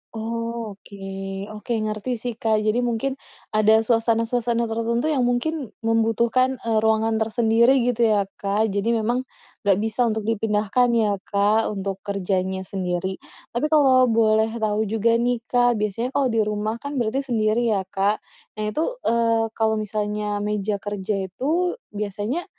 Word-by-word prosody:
Oh, 230 -1 -4
oke. 200 - -14 0.6
Oke, 235 +3 -4
ngerti 215 +3 -3
sih, 245 -1 -3
Kak. 220 -2 +1
Jadi 220 +3 +1
mungkin 250 +4 -1 0.3
ada 215 +1 +4
suasana-suasana 230 +1 +1
tertentu 235 +5 0
yang 265 -5 +2
mungkin 255 +2 -1
membutuhkan, 225 +3 +1
eee, 225 -1 0
ruangan 220 0 +2
tersendiri 230 +3 +3
gitu 240 -1 +2
ya, 200 -2 +1
Kak. 205 +2 0
Jadi 205 +4 0
memang 240 +3 0 0.4
nggak 200 - +5
bisa 225 +3 +1
untuk 220 -1 0
dipindahkan 220 +2 +1
ya, 210 -3 +2
Kak, 205 +3 +1
untuk 195 -1 -3
kerjanya 190 -1 -1
sendiri. 185 0 -3 0.3
Tapi 240 +5 -1
kalau 265 -4 +6
boleh 220 -1 +3
tahu 215 0 +1
juga 225 +2 +2
nih, 240 0 0
Kak, 245 -3 +3
biasanya 230 +5 -2
kalau 270 -3 +2
di 225 -2 +1
rumah 215 +1 -2
kan 285 +4 -6
berarti 260 +5 -1
sendiri 225 -1 +1
ya, 195 - +1
Kak. 195 +2 -1 0.4
Nah 210 - -1
itu, 310 +10 -1 0.2
eee, 230 -1 +2
kalau 220 -1 +1
misalnya 210 0 -2
meja 210 0 -1
kerja 200 -1 -3
itu 315 - -1 0.2
biasanya 210 - -3
225 Hz, 150 wpm, -23 LUFS, 210-235 Hz, 0.6 s, kalau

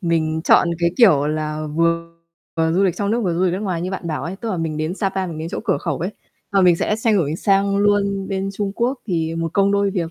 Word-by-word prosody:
mình 160 -3 0
chọn - - +5
cái, 170 0 +2
kiểu 155 - +5
là, 155 0 -2
vừa 165 0 +1 0.6
du 185 +4 +2
lịch 185 -4 +1
trong 200 0 -1
nước, 235 +2 +1
vừa 175 -2 0
du 180 - +1
lịch 180 - +1
nước 190 - -2
ngoài 185 -5 -2
như 185 - -3
bạn 190 -3 -5
bảo 155 -5 -3
ấy, 175 +3 -5
tức 225 +2 -5
là 185 - -2
mình 160 -2 -3
đến 155 +3 -2
Sa 195 0 0
Pa, 190 0 -3
mình 160 -3 -6
đến 160 - -4
chỗ 185 - -4
cửa 195 - +1
khẩu - - -3
ấy, 180 +4 -2 0.4
và 195 - +4
mình 180 -2 +5
sẽ 210 - 0
xoay 225 -1 +1
đổi 160 -5 0
sang 200 +1 +2
luôn 200 -1 +1
bên 195 0 -2
Trung 200 0 -3
Quốc, 245 +5 -1
thì 165 -3 -1
một 165 -1 -3
công 200 0 +2
đôi 200 0 +2
việc, 170 -4 -2
185 Hz, 275 wpm, -20 LUFS, 165-200 Hz, 0.6 s, chọn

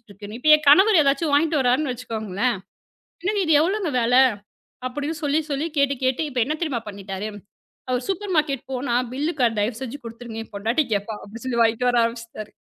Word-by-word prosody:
இருக்கு. 205 0 -11
இப்ப 310 - -1
என் 305 - -9
கணவர் 385 +7 +7
எதாச்சும் 285 +2 +1
வாங்கிட்டு 310 +1 +2
வர்றாருன்னு 255 +2 +2
வச்சுக்கோங்களேன், 225 -2 -2 0.7
"என்னங்க, 410 +2 0
இது 320 - +3
எவ்ளோங்க 380 +1 0
விலை?" 245 +2 +4 0.7
அப்படின்னு 290 +5 -4
சொல்லிச் 300 +2 0
சொல்லி, 285 +3 -1
கேட்டு 280 0 +2
கேட்டு 260 +3 +1
இப்ப 255 -3 -3
என்ன 305 +4 -1
தெரியுமா 275 -8 -1
பண்ணிட்டாரு? 200 +1 -6 0.6
அவர் 250 0 -1
சூப்பர் 390 0 -2
மார்கெட் 285 -4 0
போனா 250 -1 -1 0.2
பில் 295 +5 -1
க 245 -2 +4
தயவு 220 +3 -1
செஞ்சு 265 +2 -6
குடுத்துருங்க, 230 -1 -7
என் - - -28
பொண்டாட்டி 225 +9 0
கேப்பா, 205 +2 -2
அப்படின்னு 225 +4 -10
சொல்லி 245 -2 -1
வாங்கிட்டு 230 +2 +2
வர 245 -1 +3
ஆரம்பிச்சிட்டாரு. 230 -2 -5
255 Hz, 180 wpm, -23 LUFS, 230-300 Hz, 0.7 s, கணவர்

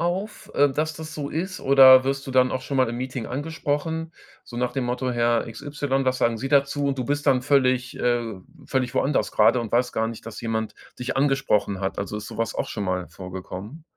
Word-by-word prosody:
auf, 185 +5 -3
äh, 145 0 +5
dass 155 +3 -2
das 160 +1 -8
so 145 -2 -4
ist 180 +5 -4
oder 130 -1 +8
wirst 135 +1 -2
du 135 - -5
dann 130 0 +4
auch 130 - -2
schon 140 - -3
mal 130 -2 +3
im 120 - -4
Meeting 125 -2 -4
angesprochen, 160 +3 -3 0.3
so 120 - -11
nach 125 0 -1
dem 135 - -1
Motto: 125 +1 -2
„Herr 120 -1 +1
XY, 135 +3 -2
was 130 0 +1
sagen 115 -1 +2
sie 135 +4 -4
dazu?“, 140 0 +2
und 135 -1 -2
du 125 - -1
bist 145 +3 -1
dann 125 -2 +3
völlig 130 -3 +2
äh, 120 -1 +1 0.4
völlig 130 -2 -1
woanders 140 0 +1
gerade 125 - +4
und 115 -2 -5
weiß 125 +1 +1
gar 110 0 0
nicht, 115 -1 -9
dass 115 - -7
jemand 110 -2 -2 0.2
dich 125 +1 -3
angesprochen 135 -8 +1
hat? 95 0 -3
Also, 100 +1 -4
ist 105 0 -6
so - - -9
was 115 0 -1
auch - - -2
schon 105 - -4
mal 90 -2 -2
vorgekommen? 95 - -8
130 Hz, 225 wpm, -24 LUFS, 115-145 Hz, 0.4 s, oder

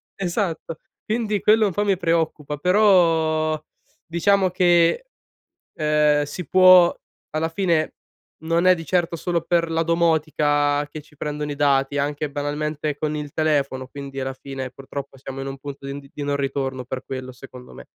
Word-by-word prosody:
Esatto. 175 -4 -3 0.3
Quindi, 215 -2 -1
quello 215 0 +4
un - - -2
po' 205 +3 0
mi 195 -3 +2
preoccupa, 160 -4 -1
però 165 -4 +3 0.5
diciamo 185 +3 +2
che, 175 - +3 0.7
ehm, 150 -1 +3
si 145 +4 -6
può 185 -1 +7 0.4
alla 160 +1 -1
fine, 165 -3 0 0.5
non 165 +2 +1
è 185 - +7
di 165 -1 -8
certo 175 -1 0
solo 170 0 -1
per 170 -1 0
la 165 0 +1
domotica 150 -3 +1
che 155 0 -8
ci 150 0 -23
prendono 150 0 -4
i - - -4
dati, 140 -1 +2
anche 145 +1 -1
banalmente 150 +1 -3
con 155 0 -2
il 145 -1 -5
telefono, 140 -4 0
quindi 135 -1 -8
alla 130 0 -3
fine 135 -1 -7
purtroppo 135 0 -8
siamo 135 +1 -8
in 135 - -5
un 135 0 -6
punto 140 0 -8
di 140 - -4
n 140 - -6
di 145 - -5
non 145 0 -1
ritorno 135 -2 -2
per 130 +1 -6
quello, 130 -1 -6
secondo 125 0 -13
me. - - -12
150 Hz, 165 wpm, -22 LUFS, 140-170 Hz, 0.7 s, può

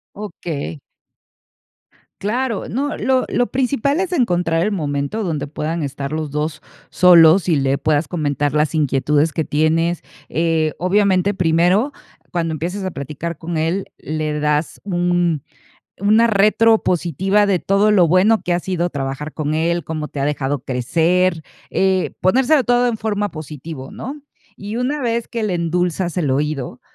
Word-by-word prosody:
Okey. 170 -7 -6 1.4
Claro, 230 +2 -2
no, 285 +6 -2
lo 260 -1 +1
lo 245 - +1
principal 270 +3 0
es 375 -1 -2
encontrar 175 - +1
el 210 +4 0
momento 145 +4 -2
donde 155 -5 -2
puedan 155 +3 -3
estar 140 0 -4
los 155 -1 -3
2 150 +2 -3 0.3
solos 175 0 +6
y 165 - +3
le 135 0 +1
puedas 150 -1 +1
comentar 145 -3 -1
las 150 0 +1
inquietudes 145 +1 +1
que 160 - -1
tienes, 165 +3 +1 0.3
eh, 160 -1 0
obviamente, 190 +1 +2
primero, 180 - +2 0.4
cuando 165 -2 -1
empieces 175 +6 -4
a 185 - -2
platicar 150 +2 -6
con 170 0 -5
él, 165 +5 -1
le 155 -1 -3
das 150 +1 -1
un 175 -4 0 0.6
una 215 +3 +4
retro 220 +1 +4
positiva 185 +4 +1
de 190 -3 +1
todo 200 +2 +2
lo 180 -5 +5
bueno 195 +6 +4
que 175 - -1
ha 175 - +2
sido 175 -1 -2
trabajar 140 +1 -4
con 155 -1 -2
él, 170 +2 0
cómo 155 -1 -4
te - - -8
ha 135 - 0
dejado 145 -1 -1
crecer, 165 +8 +1 0.3
eh, 190 -1 +1
ponérselo 260 - +3
todo 245 0 +3
en 235 - -1
forma 205 -1 -2
positivo, 150 -2 -8
¿no? 275 +5 -7 0.4
Y 205 +2 -7
una 255 +5 -1
vez 235 -2 -1
que 230 -2 -3
le 200 -4 -1
endulzas 175 +1 -1
el 150 -7 +1
oído, 140 -3 -2
170 Hz, 155 wpm, -19 LUFS, 150-205 Hz, 1.4 s, solos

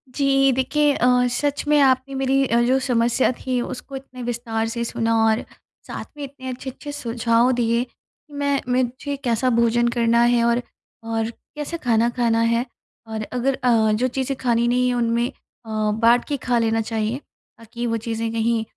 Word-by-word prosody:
जी। 275 -1 +3
देखिए 275 +3 +2
अ, 245 - +2 0.2
सच 290 +3 -1
में 300 0 +4
आपने 265 0 +2
मेरी 270 0 +2
अ, 235 0 +2
जो 255 +2 +3
समस्या 245 -1 +2
थीं 255 0 -2
उसको 260 +2 -7
इतने 260 -2 -9
विस्तार 230 -2 -2
से 235 +1 -3
सुना 230 0 0
और 220 0 +2 0.5
साथ - - -6
में 290 - -6
इतने 265 -1 -8
अच्छे-अच्छे 265 +3 -7
सुझाव 235 -2 +1
दिए 235 0 +2
कि 290 +4 -22
मैं 285 -1 0
मुझे 255 +3 -1
कैसा 240 0 +1
भोजन 235 0 +2
करना 235 0 +3
है 240 0 +3
और 235 +1 +2 0.4
और 225 0 -2 0.3
कैसे 300 +3 -4
खाना 235 -5 +2
खाना 235 -2 +1
है? 230 +1 +1 0.4
और 220 -1 -4
अगर 255 +2 0
अ, 225 -3 +3
जो 225 +4 +1
चीज़ें 265 +1 -2
खानी 235 -1 +2
नहीं 250 +1 +2
है 250 - +1
उनमें 235 0 +1
अ, 225 - -19
बाँट 220 +3 +2
के 290 - -1
खा 245 -1 +3
लेना 225 0 +1
चाहिए 220 +2 -2 0.4
ताकि 230 +1 -6
वो 230 0 0
चीज़ें 225 0 -2
कहीं 230 0 0
240 Hz, 175 wpm, -22 LUFS, 230-265 Hz, 0.5 s, में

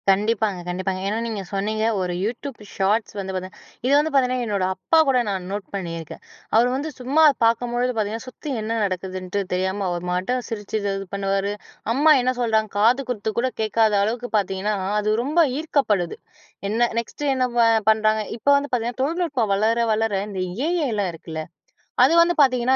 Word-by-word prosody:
கண்டிப்பாங்க, 210 0 +2
கண்டிப்பாங்க. 185 +1 -2
ஏன்னா 210 +2 -1
நீங்க 220 -3 -3
சொன்னீங்க 210 +2 -1 0.2
ஒரு 180 -1 -2
YouTube 240 +4 -4 0.2
ஷார்ட்ஸ் 205 +3 +1
வந்து 190 -1 -4
பார்த்தீங்க 185 +1 -6 0.3
இது 260 - +2
வந்து 305 +2 +2
பாத்திங்கன்னா 255 -2 +2
என்னோட 200 -4 -1
அப்பா 325 - +1
கூட 265 -2 +4
நான் 190 -2 -3
நோட் 200 -1 -4
பண்ணியிருக்கேன். 165 -4 -6 0.3
அவர் 235 +2 +5
வந்து 290 +4 -3
சும்மா 275 +6 +3 0.2
பார்க்கும்பொழுது 240 +2 +1
பாத்திங்கன்னா 220 +2 -2
சுத்தி 295 +4 -8
என்ன 225 +1 -2
நடக்குதுன்ட்டு 185 +1 -3
தெரியாம 190 +2 -1
அவர் 175 0 -3
மாட்ட 185 +8 0
சிரிச்சு, 210 -2 -5
இது 195 -1 -2
பண்ணுவாரு. 195 0 0 0.4
அம்மா 300 +5 +6
என்ன 255 +1 +1
சொல்றாங்க 220 -3 +1
காது 240 +6 +4
குத்து 220 -3 -2
கூட 255 - +1
கேட்காத 220 0 +2
அளவுக்கு 240 +3 -2
பார்த்திங்கன்னா 195 +1 -1 0.2
அது 210 0 -1
ரொம்ப 300 +6 0 0.2
ஈர்க்கப்படுது. 220 - 0 0.5
என்ன 235 +3 +2
நெக்ஸ்ட்டு 280 +5 -3
என்ன 255 -1 +2 0.4
பண்ணுறாங்க? 215 0 +3 0.2
இப்போ 260 - 0
வந்து 285 0 -3
பார்த்திங்கன்னா 245 +1 -1
தொழில்நுட்பம் 295 - 0
வளர, 220 +3 +2 0.2
வளர 220 0 0 0.2
இந்த 195 -2 -5
AIலாம் 240 - -1
இருக்குல்ல 160 -1 -6 0.6
அது 270 +6 +5
வந்து 340 +1 +5
பார்த்திங்கன்னா 255 -2 +4
220 Hz, 160 wpm, -23 LUFS, 195-250 Hz, 0.6 s, அம்மா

